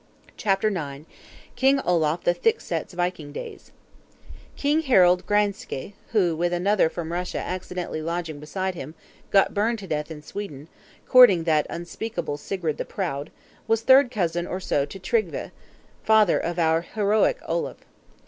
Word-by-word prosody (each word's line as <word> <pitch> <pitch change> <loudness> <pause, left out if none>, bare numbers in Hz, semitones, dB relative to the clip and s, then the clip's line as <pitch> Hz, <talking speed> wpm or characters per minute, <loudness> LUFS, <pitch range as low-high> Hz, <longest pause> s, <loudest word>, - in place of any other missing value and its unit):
CHAPTER 195 +1 +1
IX. 150 -6 -5 0.5
KING 270 +1 +3
OLAF 170 - +1
THE 175 - +3
THICK 455 - +1
SET'S - - -4
VIKING 175 -4 -2
DAYS - - -8 0.8
King 295 +3 +1
Harald 185 - +4
Graenske, 205 - -1 0.2
who, 180 -7 +2
with 175 +2 0
another 185 0 +2
from 165 -1 -5
Russia 180 +1 -3
accidentally 180 -3 -4
lodging 165 -2 -4
beside 185 +5 -3
him, 155 -2 -8 0.3
got 195 - +4
burned 225 +3 +1
to 205 - -9
death 150 -3 -3
in 150 -2 -9
Sweden, 155 -5 -7 0.4
courting 230 -10 +7
that 155 -2 +2
unspeakable 175 -2 -4
Sigrid 165 0 -3
the - - -2
Proud, 150 -7 -4 0.4
was 225 0 +2
third 265 +1 +6
cousin 175 -6 -1
or 185 - -3
so 145 -6 0
to 195 - -9
Tryggve, 445 - -1 0.5
father 215 -4 +4
of 170 0 -3
our 165 -1 +2
heroic 210 - +1
Olaf. - - -2
180 Hz, 150 wpm, -24 LUFS, 160-210 Hz, 0.8 s, courting